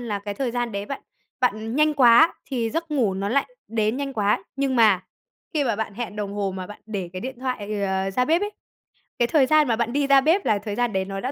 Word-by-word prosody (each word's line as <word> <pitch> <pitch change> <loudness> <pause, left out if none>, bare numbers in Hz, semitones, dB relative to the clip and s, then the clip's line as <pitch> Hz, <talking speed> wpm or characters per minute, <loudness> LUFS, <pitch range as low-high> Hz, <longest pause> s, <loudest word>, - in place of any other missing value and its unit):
là 220 -4 -3
cái 200 0 -6
thời 255 +3 -2
gian 240 -1 -2
đấy 200 0 -4
bạn 275 - -6 0.4
bạn 225 -1 0
nhanh 305 0 +3
quá 260 +4 +6
thì 235 -4 -2
giấc 330 0 -3
ngủ 235 -10 +1
nó 195 +1 -2
lại 275 +4 +1 0.2
đến 220 +1 0
nhanh 275 -1 -3
quá. 210 -4 +1
Nhưng 270 -1 0
mà 210 -5 +4 0.5
khi 295 -2 +2
mà 230 -4 0
bạn 220 -2 -4
hẹn 225 -1 -5
đồng 205 -1 -3
hồ 200 -2 -2
mà 185 - -5
bạn 210 - -11
để 195 -5 -4
cái 185 - -6
điện 260 +1 -6
thoại, 215 -6 -3
ờ, 190 0 0
ra 250 +6 +1
bếp 330 +6 +2
ấy, 415 - -1 0.7
cái 240 - +3
thời 275 0 +4
gian 305 0 +4
mà 230 - +2
bạn 235 +1 -1
đi 285 0 +1
ra 275 -1 +6
bếp 330 +8 +2
là 215 - +3
thời 205 -1 -5
gian 240 -1 0
đấy 190 0 0
nó 195 0 -5
đã 255 +6 -3
230 Hz, 260 wpm, -24 LUFS, 205-270 Hz, 0.7 s, quá